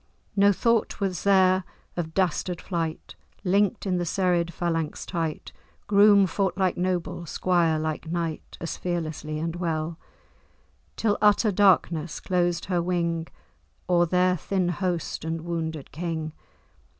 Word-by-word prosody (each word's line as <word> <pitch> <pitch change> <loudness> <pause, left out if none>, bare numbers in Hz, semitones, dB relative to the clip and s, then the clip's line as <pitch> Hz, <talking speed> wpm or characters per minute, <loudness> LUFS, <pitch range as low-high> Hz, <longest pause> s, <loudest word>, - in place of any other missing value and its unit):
No 200 0 +5
thought 230 +3 +1
was 190 -4 -1
there 190 -1 +4 0.3
of 160 -2 -4
dastard 180 -1 0
flight: 165 -3 -4 0.3
Link'd 200 +4 +2
in 185 -2 +1
the - - 0
serried 175 -1 +1
phalanx 165 -2 -2
tight, 165 -4 -3 0.3
Groom 205 -1 +6
fought 190 0 -1
like 185 -2 +1
noble, 180 -1 -2
squire 170 -1 +2
like 155 +1 -3
knight, 170 -2 -3
As 165 - -4
fearlessly 155 -3 -3
and 165 +2 -3
well; 165 -1 -2 1.0
Till 210 -2 +1
utter 210 +1 +4
darkness 175 -5 +2
closed 175 -2 0
her 180 -2 0
wing 170 -2 -1 0.6
O'er 175 -1 +3
their 180 +1 +3
thin 185 +1 -1
host 175 -1 -2
and 160 0 -3
wounded 160 -3 -4
King. 160 0 -3
175 Hz, 130 wpm, -26 LUFS, 165-185 Hz, 1.0 s, Groom